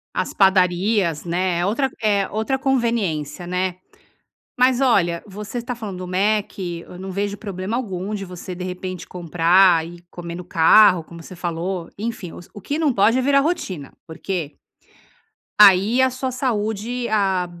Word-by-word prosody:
As - - -2
padarias, 185 -2 +2
né, 175 0 0
é - - 0
outra 250 +6 +1
é 200 -3 +2
outra 220 +5 -1
conveniência, 215 - -1
né? 180 0 -1 0.8
Mas 255 +1 +4
olha, 175 -10 +2
você 210 +4 -6
tá 245 +1 -5
falando 205 -6 -7
do 180 - -6
Mc, 190 -3 -1
eu 180 - -11
não 190 0 -6
vejo 200 +1 -2
problema 200 +2 -4
algum 195 -4 -4
de 200 -2 -4
você 180 0 -8
de 180 - -6
repente 185 0 -6
comprar 175 0 +3
e 175 0 -12
comer 170 -1 -7
no 180 - -7
carro 175 +1 +5
como 170 +1 -12
você 185 - -11
falou, 175 +1 -4
enfim, 215 -5 -5
o - - -9
s 175 - -15
o 205 - -9
que 290 +8 -3
não 305 -4 +2
pode 225 +5 +3
é - - +2
virar 275 +1 +4
rotina 195 - -3
porque 165 -2 -4 1.1
aí, 205 +5 +6
a 260 - +5
sua 255 +1 -3
saúde 235 -1 -2
a 190 -4 +1
190 Hz, 165 wpm, -21 LUFS, 175-220 Hz, 1.1 s, aí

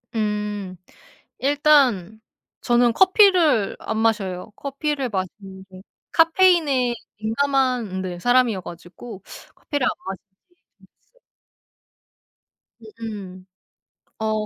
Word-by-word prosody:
음. 210 -3 -3 0.6
일단 270 - +2 0.4
저는 240 -1 +3
커피를 365 - +4
안 220 - -4
마셔요. 210 -4 -1
커피를 280 -1 -3
마시는 190 -1 -6
게 185 0 -13 0.3
카페인에 325 -8 +3 0.3
민감한 250 -4 0
네 180 -2 -5
사람 245 +4 +3
이어 195 -4 -4
가지고 185 +5 -11 0.3
커피를 285 -4 -3
안 - - +2 0.2
마시게 190 0 -7 0.5
됐어요. - - -28 1.8
으음. 195 -5 -8 0.7
어 215 -1 -1
225 Hz, 195 characters per minute, -22 LUFS, 195-280 Hz, 1.8 s, 커피를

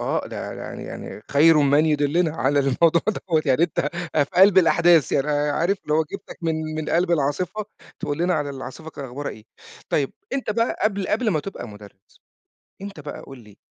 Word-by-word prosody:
آه. - - -1
ده - - -6
يعني - - -7
يعني 105 - -8
خَير 155 +3 +6
من 145 +2 +4
يُدلِّنا 155 +2 +1
على 135 +4 +1
الموضوع 155 +5 +3 0.3
دوّة، 160 -2 +2
يعني 135 +4 +3
أنت 155 -3 0 0.3
أ 145 -2 +4
في - - -21
قَلْب 190 +1 +6
الأحداث. 170 -4 +4
يعني 140 +2 +1
عارف 150 +6 +1
لو 155 +1 +2
جِبتك - - -8
من 165 -1 0 0.2
من 155 -1 -4
قَلْب 175 +1 +1
العاصفة 170 +7 0 0.4
تقول 145 0 -3
لنا 175 +1 +1
على 145 -2 -1
العاصفة 140 +3 -8
ك - - -19
أخبارها 140 +1 -5
إيه؟ 110 - -12 0.4
طيب، 140 -2 0 0.2
أنت 270 -5 -2
بقى 230 +2 0
قبل 200 -3 0
قبل 225 +1 +1
ما 155 - 0
تبقى 195 - -7
مُدرِّس، 105 -2 -15 0.6
أنت 200 -4 -8
بقى 145 0 -7
قُل 135 -1 -12
لي، 105 -3 -17
155 Hz, 190 wpm, -23 LUFS, 140-175 Hz, 0.6 s, خَير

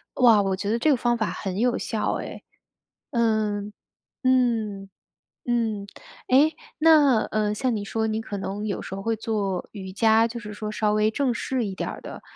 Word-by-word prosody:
哇， 230 -5 +6
我 190 -1 0
觉 200 +2 -4
得 230 - +2
这 300 +6 +3
个 270 - +3
方 240 0 +1
法 215 - -1
很 190 -1 -4
有 245 +2 +2
效 220 -2 -1
哎， - - -8 0.7
嗯， 215 -3 0 0.5
嗯， 230 -6 +1 0.6
嗯， 225 -4 0 0.4
诶， 290 +5 +5 0.2
那， 300 -7 +6
呃， 210 -1 0
像 240 +3 0
你 205 - -3
说 220 +2 -1
你 220 +1 -1
可 205 -2 -5
能 200 +2 -4
有 200 -3 -3
时 190 - -6
候 195 - -6
会 225 +3 0
做 200 -5 -2
瑜 190 -3 -7
伽， 220 +3 +4
就 235 +1 -6
是 210 -2 -8
说 210 0 -5
稍 210 -1 +1
微 215 +1 +2
正 260 0 0
式 250 0 -2
一 195 -2 -4
点 - - -3
儿 - - -7
的， - - -9
220 Hz, 205 characters per minute, -25 LUFS, 205-240 Hz, 0.7 s, 哇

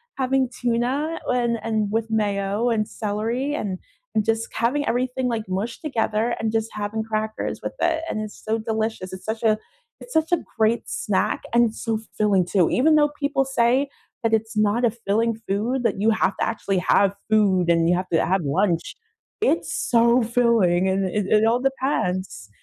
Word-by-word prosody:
having 265 -1 +1
tuna 250 +7 -1
and 240 -2 +1
and 215 -2 -1
with 225 +1 -1
mayo, 205 +1 0
and 215 -2 0
celery, 225 +7 -2
and 195 -8 -3 0.3
and 215 - +2
just 225 0 0
having 265 +6 0
everything, 250 +1 0
like, 230 -3 -1
mushed 200 +5 -3
together, 235 -5 0
and 220 -1 -1
just 225 0 -1
having 210 +1 -3
crackers 220 0 -3
with - - -4
it, 325 -2 +1
and 215 - -2
it's 215 -1 -7
so 220 +1 0
delicious. 220 -3 -3
It's 185 0 -9
such 220 +1 -3
a 215 -1 +4 0.4
it's - - -11
such 320 +1 +1
a 350 - +5 0.2
great 220 +1 +2
snack, 210 +1 -1
and 235 -1 +5
it's 220 - -9
so 225 -2 -1 0.2
filling 200 -4 +2
too, 180 -1 +2
even 305 +6 +3
though 295 -1 +4
people 280 -1 +1
say 260 +1 +2 0.4
that 225 -1 +1
"It's 225 0 -4
not 215 +3 +2
a 230 - +3
filling 230 0 0
food, 225 +7 0
that 215 -4 0
you 220 +2 +3
have 215 -3 +1
to - - 0
actually 200 -3 -2
have 195 +2 +3
food 195 -5 +3
and 165 0 +3
you 175 - +4
have 185 +1 -2
to 165 - +3
have 190 +2 +1
lunch," 170 +4 0 0.5
it's, 450 - +1
so, 235 +1 +3
filling 225 -7 +2
and 190 +1 +1
it 195 +2 -1
it 215 +2 +4
all 230 +2 +3
depends, 195 - -2
220 Hz, 185 wpm, -23 LUFS, 205-240 Hz, 0.5 s, a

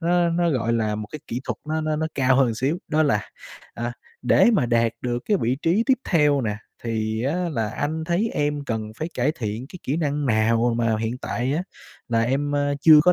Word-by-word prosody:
nó 175 0 +2
nó, 170 0 +2
gọi 115 -5 0
là, 110 -2 0
một 105 0 -4
cái 155 - -5
kỹ 120 +2 -3
thuật - - -3
nó 155 0 0
nó 155 0 -1
nó 160 +1 0
cao 130 -1 +3
hơn 135 -1 +5
một 115 - -1
xíu, 140 +9 0
đó 155 0 +3
là 110 -9 0 0.4
"À, 120 +1 -3 0.3
để - - +5
mà 130 - +2
đạt 115 -1 +2
được 120 -1 -1
cái 210 - +2
vị 125 +3 +1
trí 180 +7 +3
tiếp 265 -2 +4
theo 150 -5 +3
nè, 105 -3 -2 0.3
thì 110 0 -1
á 140 +5 0 0.2
là 115 -4 -1
anh 160 +5 -2
thấy 180 +7 0
em 145 -1 -1
cần 110 -3 -3
phải 160 - -2
cải 130 +5 +1
thiện 115 -3 -4
cái 180 - -10
kỹ 140 - -1
năng 145 -3 -1
nào 115 +1 +3
m - - -2
mà 115 -1 +2
hiện 115 +2 -2
tại 125 +1 -2
á 165 +4 0 0.5
là 115 -1 +2
em, 140 +4 0
ơ, 145 0 +1
chưa 155 -1 +8
có 180 - +5
135 Hz, 240 wpm, -23 LUFS, 115-155 Hz, 0.5 s, chưa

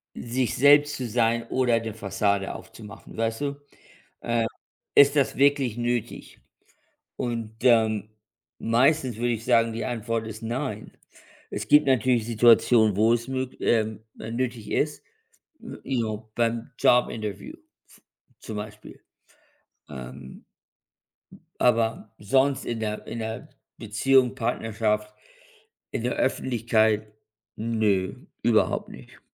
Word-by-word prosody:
„sich 120 0 -2
selbst 145 +2 +5
zu 130 - -4
sein 115 0 +1
oder 125 -3 +2
'ne 110 -2 -6
Fassade 100 -1 -1
aufzumachen“, 110 -1 -12
weißt 115 0 -1
du? 140 -1 -2 0.6
Äh. 115 -1 0 0.5
Ist 140 +1 +6
das 140 -3 +2
wirklich 135 -4 +2
nötig? 120 -1 -3 0.8
Und, 115 -3 -4
ähm, 110 -4 +3 0.5
meistens, 130 +2 +2
würde 120 +1 0
ich 115 - -5
sagen, 115 0 +3
die 115 - -4
Antwort 115 -2 -3
ist: 110 +1 -8
„Nein.“ 115 -2 -4 0.6
Es - - -4
gibt 150 -1 +5
natürlich 125 -2 +2
Situationen, 115 -2 +5
wo 110 +2 +4
es 120 +1 -2
mög 130 -1 -4
ähm, 110 -1 0 0.2
äh, 110 - -6
nötig 120 -2 -3
ist. 150 0 -1 0.6
Ähm, - - -9
ja, 115 -5 -1 0.2
beim 115 +1 -1
Job-Interview 105 -5 +1 0.3
f - - -21 0.4
zum 110 - -8
Beispiel. 105 0 -9 0.9
Ähm 65 +1 -10 1.2
aber 115 -3 +1
sonst 135 +6 +1
in 115 -1 -3
der 105 -1 -4
in - - -6
der 110 +2 -5 0.3
Beziehung, 125 +4 +2
Partnerschaft, 110 -3 -1 0.8
in - - -3
der - - 0
Öffentlichkeit. 110 -3 +1 0.4
Ne, 105 -4 -1 0.2
überhaupt - - +2
nicht. 65 -2 -14
115 Hz, 120 wpm, -25 LUFS, 110-125 Hz, 1.2 s, Ist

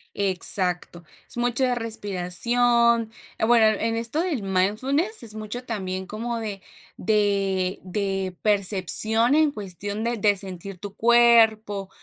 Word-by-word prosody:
Exacto. 180 -3 0 0.2
Es - - -8
mucha 245 +1 0
respiración. 230 +2 +1 0.3
Eh, - - 0
bueno, 230 -1 +5
en 225 0 -1
esto 235 +8 -1
del 320 - -2
mindfulness, 245 - 0
es 220 -1 -7
mucho 215 +3 -6
también 190 -5 -4
como 230 +2 -4
de 205 -3 -5 0.4
de 195 -2 0
de 195 -1 -3
percepción, 215 - +2
en 310 -2 +3
cuestión 205 - -5
de 235 0 -1
de 205 0 +2
sentir 190 -1 -7
tu 200 0 -9
cuerpo, 225 -4 +3
215 Hz, 125 wpm, -24 LUFS, 195-235 Hz, 0.4 s, bueno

